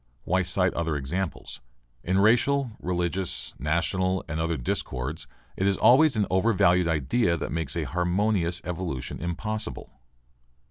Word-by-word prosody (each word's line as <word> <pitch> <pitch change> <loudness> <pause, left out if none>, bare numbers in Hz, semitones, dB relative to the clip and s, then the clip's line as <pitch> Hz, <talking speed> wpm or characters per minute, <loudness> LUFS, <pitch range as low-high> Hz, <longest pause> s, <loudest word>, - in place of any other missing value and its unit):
Why 95 +1 +1
cite 90 0 +1
other 80 -2 -1
examples? 80 +6 -4 0.4
In 95 +2 +1
racial, 120 +5 +3
religious, 90 +1 -2
national, 90 +5 0
and 80 - -3
other 80 0 0
discords 65 +3 -3 0.3
it 95 - 0
is 100 -1 +2
always 140 +3 +5
an 105 -2 +2
overvalued 90 -3 +3
idea 85 - +1
that - - -4
makes 80 -3 -2
a 85 - -1
harmonious 90 - 0
evolution 85 -7 -4
impossible. 85 - -4
90 Hz, 130 wpm, -26 LUFS, 80-95 Hz, 0.4 s, always